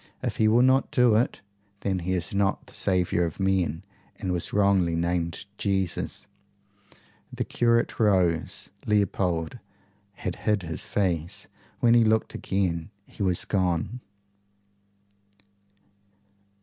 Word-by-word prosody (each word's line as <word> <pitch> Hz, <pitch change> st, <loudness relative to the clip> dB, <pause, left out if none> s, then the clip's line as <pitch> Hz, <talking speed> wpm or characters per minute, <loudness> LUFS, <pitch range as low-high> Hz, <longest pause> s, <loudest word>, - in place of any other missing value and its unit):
If -, -, -2 dB
he 110 Hz, -, +3 dB
will 115 Hz, +3 st, +5 dB
not 130 Hz, +1 st, +3 dB
do 125 Hz, -6 st, +4 dB
it, 115 Hz, +3 st, +1 dB, 0.4 s
then 95 Hz, -2 st, -1 dB
he 90 Hz, +2 st, -2 dB
is 90 Hz, 0 st, -2 dB
not 100 Hz, -1 st, 0 dB
the -, -, -16 dB
saviour 90 Hz, -2 st, +1 dB
of 85 Hz, +2 st, -4 dB
men, 95 Hz, -5 st, 0 dB, 0.3 s
and 95 Hz, -, -3 dB
was 90 Hz, -2 st, 0 dB
wrongly 100 Hz, -4 st, +3 dB
named 85 Hz, 0 st, -1 dB
Jesus." 95 Hz, -3 st, -1 dB, 1.1 s
The -, -, -2 dB
curate 115 Hz, -1 st, +1 dB
rose. 95 Hz, -2 st, +1 dB, 0.2 s
Leopold 95 Hz, -2 st, 0 dB, 0.5 s
had 95 Hz, -2 st, -5 dB
hid 105 Hz, -3 st, 0 dB
his 80 Hz, -2 st, -3 dB
face. 90 Hz, -3 st, -1 dB, 0.3 s
When 120 Hz, -1 st, +5 dB
he 120 Hz, -1 st, +6 dB
looked 110 Hz, 0 st, +1 dB
again 90 Hz, -3 st, -1 dB, 0.2 s
he -, -, -12 dB
was 90 Hz, -3 st, +2 dB
gone. 95 Hz, +4 st, -1 dB
95 Hz, 125 wpm, -26 LUFS, 85-105 Hz, 1.1 s, he